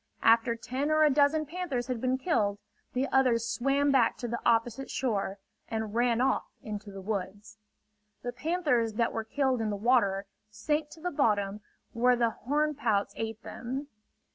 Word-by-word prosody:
After 230 +1 +4
ten 260 +5 -3
or 310 0 +4
a 300 - +5
dozen 295 +2 +3
panthers 300 -6 -3
had 250 -2 -3
been 255 0 +1
killed, 215 - +1 0.4
the 260 +2 0
others 240 -4 +3
swam 275 +5 +1
back 250 -4 +3
to 245 - -4
the 235 +1 -3
opposite 235 +3 +1
shore 205 -6 -1 0.3
and 220 -2 -3
ran 240 0 +2
off 260 - +2 0.2
into 210 -1 -6
the 195 -1 -9
woods. 205 +1 -5 0.6
The 245 - -3
panthers 250 -5 0
that 230 0 +1
were 225 - -2
killed 260 +1 0
in 220 - 0
the 205 - -1
water, 200 -3 +2 0.2
sank 295 +8 -1
to 320 - -14
the 360 +2 -2
bottom 210 -7 +1 0.3
where 245 +2 +4
the 235 -1 +2
horn 295 +7 0
pouts 220 -8 0
ate 225 0 -5
them. 265 +5 -5
240 Hz, 170 wpm, -29 LUFS, 220-275 Hz, 0.6 s, a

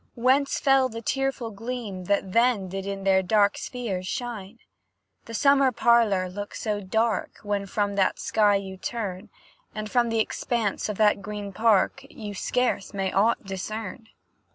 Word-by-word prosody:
Whence 265 +3 +2
fell 270 -1 +4
the 230 0 -7
tearful 270 -2 -1
gleam 220 -4 -5
that 200 0 0
then 230 -3 +3
Did 195 +1 -5
in 195 -1 -4
their 190 -1 +4
dark 200 +1 +3
spheres 200 -8 -4
shine? 230 -3 -5 0.7
The 230 - -7
summer 275 +2 +4
parlour 230 -6 +3
looks 205 +3 -7
so 210 -2 -2
dark, 220 +2 -1
When 205 -1 -2
from 205 +1 -1
that 190 - +2
sky 210 -2 +3
you 190 -1 -4
turn, 195 -3 -4 0.5
And 215 0 -5
from 240 -2 +2
th'expanse 225 -1 -1
of 210 - -3
that 210 -2 +3
green 205 0 -6
park, 220 +5 +2
You 210 -1 -7
scarce 245 -1 -1
may 195 -1 -1
aught 215 +3 +2
discern. 210 +3 -5
210 Hz, 155 wpm, -26 LUFS, 195-235 Hz, 0.7 s, fell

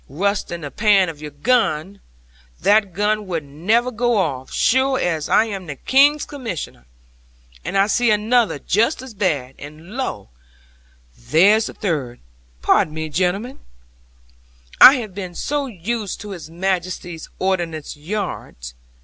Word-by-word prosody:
Rust 200 +7 -1
in 170 0 -5
the 145 -2 -6
pan 205 -4 +3
of 155 -2 -9
your 150 - -6
gun! 195 - 0 0.6
That 205 -1 +3
gun 210 +3 -1
would 165 -4 -3
never 205 - 0
go 240 0 +1
off, 135 -9 -2
sure 260 +1 +2
as 160 -4 -1
I 220 - +4
am 195 -5 -6
the 150 - -5
King's 285 - +3
Commissioner. 225 - -7 0.8
And 195 - -2
I 195 - +5
see 235 +3 +2
another 220 +3 +2
just 230 - 0
as 260 -3 -10
bad; 150 - -1
and 155 +5 -11
lo, 180 - -4 0.9
there 175 - +4
the - - -5
third! 145 - -3 0.4
Pardon 155 - +2
me, 160 0 -4
gentlemen, 190 - -1 1.2
I 265 - +11
have 220 -7 -5
been 180 -2 -7
so 290 +5 -2
used 215 -1 -4
to 210 -1 -8
His 170 -5 -8
Majesty's 175 -1 -3
Ordnance 175 -6 -2
yards. 150 - -5
190 Hz, 140 wpm, -20 LUFS, 160-220 Hz, 1.2 s, I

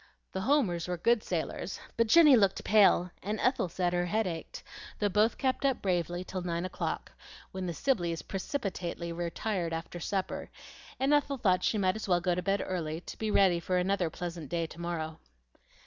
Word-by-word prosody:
The 190 - -3
Homers 195 - +1
were 180 0 -2
good 230 +6 +3
sailors, - - -3 0.2
but 230 0 +2
Jenny 300 +2 +8
looked 195 -4 +2
pale, 195 -4 +5
and 210 +3 -3
Ethel 255 -8 +1
said 175 +1 -1
her 175 0 +1
head 220 +4 +1
ached, 165 -3 -6 0.3
though 205 - +1
both 210 +4 +2
kept 260 0 0
up 270 -2 +2
bravely 175 -2 -1
till 185 0 -5
nine 170 0 -2
o'clock, 185 - -4 0.4
when 190 -1 -4
the 170 - -2
Sibleys 175 - 0
precipitately 185 -5 -4
retired 175 +1 -2
after 165 +2 -5
supper, 190 +2 -3 0.5
and 270 +3 +3
Ethel 285 -1 +2
thought 185 -6 +2
she 220 - +1
might 185 -2 +2
as 220 - -5
well 175 -2 +3
go 175 0 +1
to 180 - -1
bed 195 +2 0
early 165 -3 -3
to - - -9
be 220 - -1
ready 190 -4 +4
for 180 +2 -1
another 180 -1 +1
pleasant 170 -3 -6
day 170 -1 -1
to 165 +1 -10
morrow. 160 -2 -4
185 Hz, 190 wpm, -30 LUFS, 175-215 Hz, 0.5 s, Jenny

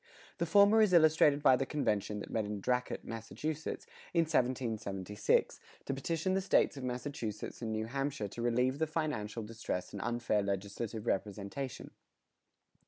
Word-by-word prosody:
The 170 - 0
former 205 +4 +6
is 210 -4 +4
illustrated 155 -3 +5
by 130 - +7
the 135 - -1
convention 105 -7 -1
that - - -8
met 110 - 0
in 105 0 -4
Dracut, 125 +4 -1
Massachusetts, 145 +8 -4 0.3
in 170 - +6
1776, 115 - 0 0.3
to - - -1
petition 165 +7 -1
the 190 - +2
States 190 - +3
of 135 - -7
Massachusetts 125 -5 -4
and 115 -2 -2
New 110 0 -1
Hampshire 135 -1 -2
to 115 - -7
relieve 125 +3 +1
the 160 - +1
financial 120 -9 -2
distress 105 -4 -4
and 100 - -5
unfair 120 -2 0
legislative 100 +3 -3
representation. 105 +5 -3
120 Hz, 150 wpm, -33 LUFS, 105-150 Hz, 0.3 s, by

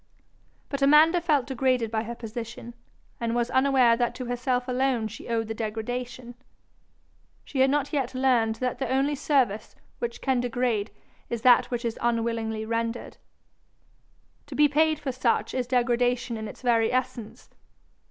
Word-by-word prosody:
But 280 -1 -4
Amanda 310 +5 +6
felt 300 -6 +2
degraded 255 -3 0
by 220 -1 0
her 235 +2 -5
position, 235 +1 -7 0.5
and 235 0 -1
was 240 0 0
unaware 260 -3 +4
that 240 0 -1
to 255 - -5
herself 245 +1 -1
alone 250 -3 0
she 215 - -10
owed 225 -1 -1
the 225 - -3
degradation: 240 +3 -5 1.1
she 275 - -4
had 265 +1 +5
not 290 +1 0
yet 265 -3 -1
learned 245 -4 +2
that 250 +1 -3
the 265 -3 -2
only 270 +3 +1
service 265 -7 0 0.2
which 235 0 -4
can 265 -2 +1
degrade 240 -3 -1 0.4
is 235 -1 -4
that 245 -1 +5
which 240 -1 -3
is 230 -1 -3
unwillingly 230 -2 -1
rendered. 230 +1 -3 1.3
To - - -8
be 300 0 +5
paid 310 +2 +2
for 280 -2 -4
such, 250 -2 0
is 255 -2 -2
degradation 245 -1 +1
in 220 -1 -5
its 210 - -11
very 230 -2 +3
essence. 245 -3 -4
245 Hz, 155 wpm, -26 LUFS, 230-265 Hz, 1.3 s, Amanda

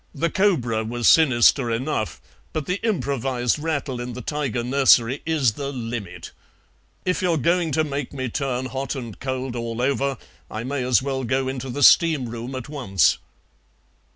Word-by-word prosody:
"The 170 0 0
cobra 135 - +1
was 120 +1 -1
sinister 130 -4 +5
enough, 115 -1 -2 0.3
but 155 -3 -2
the 180 +5 -2
improvised 135 - 0
rattle 145 -5 -2
in 120 0 -5
the 125 - -6
tiger 140 -4 -2
nursery 130 -1 +4
is 150 -7 +2
the 140 +5 -5
limit. 115 -9 -6 0.7
If 180 -1 0
you're 175 -3 +2
going 170 +3 +1
to 155 - +2
make 140 -3 -4
me 130 -2 -4
turn 130 +1 -2
hot 135 +2 -4
and 120 -6 -7
cold 130 -1 -3
all 115 -1 -4
over 135 +1 0 0.3
I 110 +1 -5
may 130 +1 -2
as 125 0 +3
well 135 -1 -2
go 130 +2 0
into 130 0 -4
the 140 +3 -2
steam 155 -4 +5
room 120 +3 -6
at 130 - -6
once." 125 - +1
130 Hz, 165 wpm, -23 LUFS, 120-145 Hz, 0.7 s, sinister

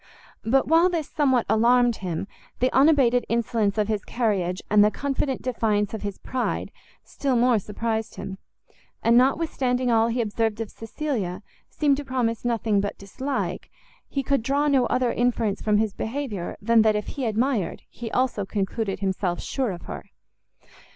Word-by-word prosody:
But 265 +4 +2
while 330 +3 +5
this 330 -4 -2
somewhat 260 -5 +2
alarmed 240 +1 +4
him, 180 -1 -4 0.3
the 255 +1 +1
unabated 265 -4 +4
insolence 225 -3 0
of 210 -1 +1
his 215 -2 -1
carriage, 195 -6 -1
and 210 0 +5
the 210 - +5
confident 275 +2 -2
defiance 215 -5 0
of 220 - -4
his 200 -2 -4
pride, 255 -1 -3 0.3
still 275 -3 -2
more 240 -1 +4
surprized 220 +2 -3
him; 190 0 -7 0.6
and 230 +1 +4
notwithstanding 255 -2 +2
all 225 0 +4
he 235 +1 -1
observed 220 -1 -1
of 225 -2 -4
Cecilia, 225 -6 -4 0.3
seemed 285 -3 +2
to 290 - -4
promise 245 -4 -1
nothing 225 -4 +1
but 200 - -4
dislike; 260 +8 -4 0.4
he 275 - -2
could 275 -1 +1
draw 280 +5 +1
no 270 -3 +3
other 250 -2 +1
inference 230 -4 0
from 210 -1 +2
his 215 -1 0
behaviour, 220 -7 -4
than 230 +2 +4
that 215 -1 +3
if 210 - -2
he 270 -4 -3
admired, 225 -3 -1
he 230 -1 -7
also 250 -5 0
concluded 195 0 -2
himself 190 -2 -1
sure 265 -3 -2
of 175 -3 -6
her. - - -7
230 Hz, 165 wpm, -25 LUFS, 210-260 Hz, 0.6 s, while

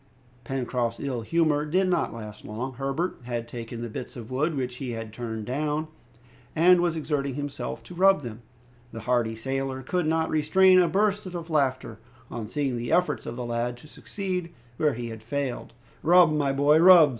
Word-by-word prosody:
Pencroft's 125 -3 -2
ill 130 -4 -3
humor 155 +3 +2
did 185 +5 +1
not 175 -2 +1
last 105 -2 -9
long. 120 +5 -5
Herbert 135 +7 -2
had 120 -1 -3
taken 115 0 -6
the - - -3
bits 110 - -7
of 120 -1 -9
wood 150 +5 0
which 125 -1 -3
he 125 -3 -4
had 115 -1 -6
turned 110 -2 -5
down, 150 +4 -2 0.7
and 175 +2 +6
was 170 -2 +1
exerting 145 -4 -2
himself 145 -1 -5
to - - -11
rub 190 0 +4
them. 115 -3 -7 0.5
The 115 - -7
hardy 120 -1 +1
sailor 135 +2 -3
could 175 +4 -1
not 160 0 +1
restrain 185 +5 +5
a 180 - +4
burst 205 +2 +1
of 170 -2 -6
laughter 130 -6 0 0.3
on 115 -3 -5
seeing 135 0 -1
the 120 0 -4
efforts 180 0 +1
of 120 - -4
the 125 0 -4
lad 120 +1 -2
to 140 - -14
succeed 180 0 -4 0.3
where 150 -4 +2
he 120 0 -5
had 110 -1 -8
failed. 135 +2 -3 0.3
"Rub, 170 -1 +6
my 145 -2 +1
boy, 145 +3 +4
rub!" 170 -3 +8
140 Hz, 185 wpm, -26 LUFS, 120-165 Hz, 0.7 s, rub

